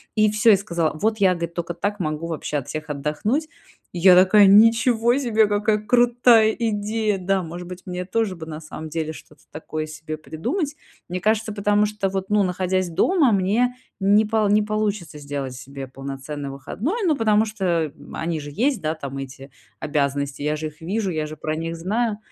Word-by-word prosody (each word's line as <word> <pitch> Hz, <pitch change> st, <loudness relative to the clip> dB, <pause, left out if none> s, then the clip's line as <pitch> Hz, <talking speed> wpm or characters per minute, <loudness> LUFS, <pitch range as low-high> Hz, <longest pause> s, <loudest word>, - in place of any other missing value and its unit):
и 215 Hz, -1 st, +4 dB
всё, 215 Hz, +2 st, +4 dB
и 200 Hz, -, +6 dB
сказала: 170 Hz, -5 st, -1 dB
"Вот 220 Hz, +1 st, +1 dB
я,- 190 Hz, -2 st, +5 dB
говорит,- 170 Hz, -1 st, -4 dB
только 170 Hz, 0 st, -4 dB
так 205 Hz, +4 st, -3 dB
могу 155 Hz, 0 st, -3 dB
вообще 155 Hz, -2 st, -3 dB
от 140 Hz, -, -5 dB
всех 155 Hz, 0 st, -6 dB
отдохнуть". 150 Hz, -, -1 dB, 0.5 s
И 175 Hz, -, -4 dB
я 180 Hz, +1 st, +7 dB
такая: 200 Hz, +2 st, +6 dB
"Ничего 225 Hz, +3 st, +5 dB
себе, 225 Hz, -5 st, +2 dB
какая 210 Hz, +1 st, +1 dB
крутая 240 Hz, 0 st, +4 dB
идея". 215 Hz, -1 st, 0 dB
Да, 190 Hz, +1 st, 0 dB
может 175 Hz, +1 st, -7 dB
быть, 180 Hz, 0 st, -9 dB
мне 180 Hz, -1 st, -4 dB
тоже 205 Hz, 0 st, -1 dB
бы 165 Hz, -2 st, -8 dB
на 155 Hz, -1 st, -7 dB
самом 155 Hz, 0 st, -8 dB
деле 160 Hz, 0 st, -3 dB
что-то 150 Hz, -1 st, -15 dB
такое 155 Hz, 0 st, -5 dB
себе 155 Hz, 0 st, -7 dB
придумать. 285 Hz, -, -3 dB, 0.3 s
Мне 180 Hz, +1 st, -4 dB
кажется, 215 Hz, +1 st, +1 dB
потому 205 Hz, 0 st, +2 dB
что 210 Hz, -2 st, -2 dB
вот, 190 Hz, 0 st, -4 dB
ну, 210 Hz, -1 st, +3 dB
находясь 185 Hz, 0 st, -1 dB
дома, 275 Hz, -, +3 dB
мне 215 Hz, +6 st, +1 dB, 0.3 s
не 205 Hz, +3 st, +4 dB
полу 215 Hz, -1 st, +1 dB
не 210 Hz, +1 st, +4 dB
получится 210 Hz, -6 st, -2 dB
сделать 140 Hz, -2 st, -5 dB
себе 135 Hz, +1 st, -8 dB
полноценный 135 Hz, +2 st, -6 dB
выходной. 195 Hz, -, -4 dB
Ну, 310 Hz, -, +3 dB
потому 220 Hz, -3 st, +3 dB
что 175 Hz, -8 st, -1 dB, 0.2 s
они 165 Hz, -1 st, -2 dB
же 145 Hz, 0 st, -8 dB
есть, 255 Hz, -, 0 dB
да, 155 Hz, 0 st, -1 dB
там, 140 Hz, -4 st, -7 dB
эти 135 Hz, 0 st, -9 dB, 0.3 s
обязанности, 140 Hz, -1 st, -1 dB
я 150 Hz, +1 st, 0 dB
же 155 Hz, +1 st, -3 dB
их 155 Hz, +1 st, -13 dB
вижу, 195 Hz, +3 st, -2 dB
я 155 Hz, -2 st, -2 dB
же 155 Hz, 0 st, -8 dB
про 155 Hz, 0 st, -3 dB
них 165 Hz, +1 st, -4 dB
знаю. 210 Hz, +5 st, -1 dB
185 Hz, 190 wpm, -22 LUFS, 155-215 Hz, 0.5 s, я